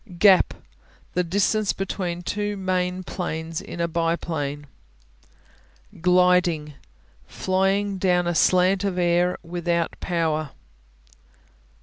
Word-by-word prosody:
Gap 195 -1 +5 0.6
The 180 - +1
distance 200 +4 +1
between 180 -2 -4
two 205 +2 -2
main 185 -1 -1
planes 165 -3 -4
in 170 - -9
a 170 - +1
biplane. 165 -3 -2 1.4
Gliding 180 -4 +3 0.5
Flying 195 +1 0
down 180 -2 +2
a 175 - 0
slant 185 +4 +3
of 195 -2 -1
air 175 0 +2
without 170 0 -2
power. 155 -4 -1
180 Hz, 95 wpm, -24 LUFS, 170-185 Hz, 1.4 s, Gap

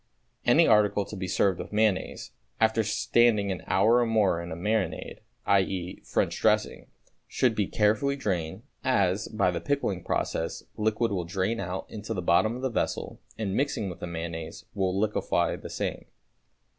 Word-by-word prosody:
Any - - +6
article 105 -1 +4
to - - -8
be 95 -1 -4
served 95 0 +1
with - - -7
mayonnaise, 105 -2 0 0.3
after 110 0 +3
standing 110 -1 +2
an 90 - -4
hour 110 +6 +4
or 120 - +3
more 100 -6 +2
in 85 - -7
a - - -3
marinade, 95 -1 -2 0.3
i.e., 95 -2 0
French - - -1
dressing, - - +1 0.4
should 125 -3 +1
be 105 -3 0
carefully 110 +6 +2
drained, 95 - -3 0.2
as, 100 -6 +1
by 100 -4 +1
the 85 -1 -3
pickling 100 -6 -1
process, 80 - -2
liquid 110 +1 0
will 95 -3 -1
drain 95 +6 -1
out 95 0 -4
into 110 +1 -6
the 90 - -2
bottom 110 +7 +3
of 125 - -7
the 130 - +1
vessel - - -2 0.2
and, 100 -4 -2
mixing 110 -6 -1
with 85 - -10
the 90 - -5
mayonnaise, 85 +2 -6
will 95 -2 0
liquefy 105 0 +1
the - - -9
same. - - -4
100 Hz, 170 wpm, -27 LUFS, 90-110 Hz, 0.4 s, Any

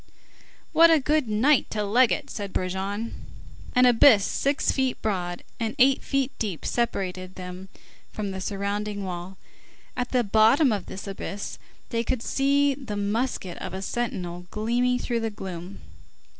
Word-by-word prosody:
"What 335 +1 +7
a 325 -2 +6
good 295 -1 +1
night 240 +7 +3
to 210 -1 -2
leg 235 +4 +4
it!" - - -2
said 200 -2 -5
Brujon. 195 +4 -2 0.6
An 250 0 +6
abyss 230 -3 +6
six 280 +1 +1
feet 265 -2 0
broad 175 -4 -2 0.2
and 225 0 -2
eighty 265 0 +5
feet 275 -1 0
deep 200 -7 -3
separated 185 -6 -2
them 185 +1 -8 0.4
from 205 -2 -4
the 190 0 -5
surrounding 200 +1 -3
wall. 180 0 -6 0.6
At 250 0 -2
the 250 -2 +2
bottom 225 +7 +4
of 200 -4 -2
this 190 - -7
abyss, 200 0 -6 0.3
they 230 -1 0
could 240 -1 -2
see 280 +1 +2
the 260 -7 -6
musket 205 -2 -2
of - - -5
a 190 - -5
sentinel 180 -7 -3
gleaming 240 +4 +1
through 240 -1 -1
the 225 0 -1
gloom. 190 -2 -8
215 Hz, 155 wpm, -26 LUFS, 190-250 Hz, 0.6 s, What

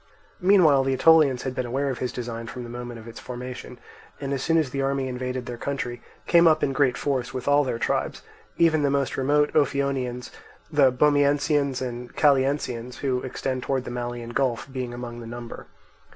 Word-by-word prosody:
Meanwhile 175 -8 +5
the 135 0 0
Aetolians 150 -4 +5
had 130 - -3
been 130 -1 -3
aware 135 +3 -1
of 130 - -5
his 125 - -2
design 115 -1 -5
from 125 +1 -7
the 120 - -8
moment 120 -1 -7
of 110 - -12
its 115 - -9
formation, 125 0 -7 0.4
and 140 -1 -3
as 135 - -2
soon 165 +3 +2
as 155 -5 +1
the 135 - -2
army 135 -1 0
invaded 125 0 -4
their 120 -1 -7
country 120 -4 -4 0.2
came 170 -1 +5
up 155 -1 +4
in 135 - +1
great 135 -3 +2
force 130 -2 -2
with 130 +1 -5
all 145 +1 +5
their 125 -4 -2
tribes; - - -2 0.3
even 160 -2 +4
the 140 - +2
most 140 -1 0
remote 145 +2 +2
Ophionians, 135 -4 0 0.4
the 140 -4 +5
Bomiensians, 145 0 +2
and 120 -1 -6
Calliensians, 130 -4 +1
who 130 -2 0
extend 130 0 -3
towards 130 0 -2
the - - -5
Malian 120 -1 -5
Gulf, 130 -1 -1
being 130 -2 -4
among 120 -1 -7
the 115 - -8
number. 120 0 -8
130 Hz, 195 wpm, -25 LUFS, 120-140 Hz, 0.4 s, Meanwhile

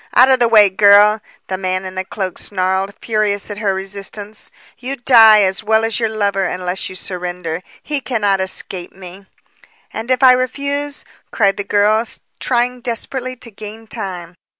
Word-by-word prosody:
"Out 255 +2 +6
of 260 - +4
the 240 - +4
way, 210 -4 +6
girl," 205 +2 +5 0.2
the 185 -1 -4
man 185 0 -2
in 185 - -7
the 185 0 -3
cloak 190 -1 -5
snarled, 190 0 -2
furious 210 -2 -1
at 205 - -6
her 205 -3 0
resistance. 200 +2 -6 0.3
"You 260 +2 -4
die 225 -5 +6
as 190 +2 -1
well 220 +1 +2
as 225 +1 -1
your 225 -2 0
lover 200 -3 0
unless 180 +1 -3
you 185 - -9
surrender. 180 -2 -4 0.2
He 295 -2 -3
cannot 205 -7 0
escape 185 -1 -3
me." 190 +1 -12 0.7
"And 225 +2 -6
if 255 0 +1
I 260 - +9
refuse," 280 +3 -2 0.2
cried 200 -3 +1
the 200 - -2
girl, 210 +2 +2 0.4
trying 245 0 0
desperately 255 +2 -4
to 235 -1 -7
gain 215 +2 -10
time. 185 -6 -6
205 Hz, 170 wpm, -17 LUFS, 190-235 Hz, 0.7 s, I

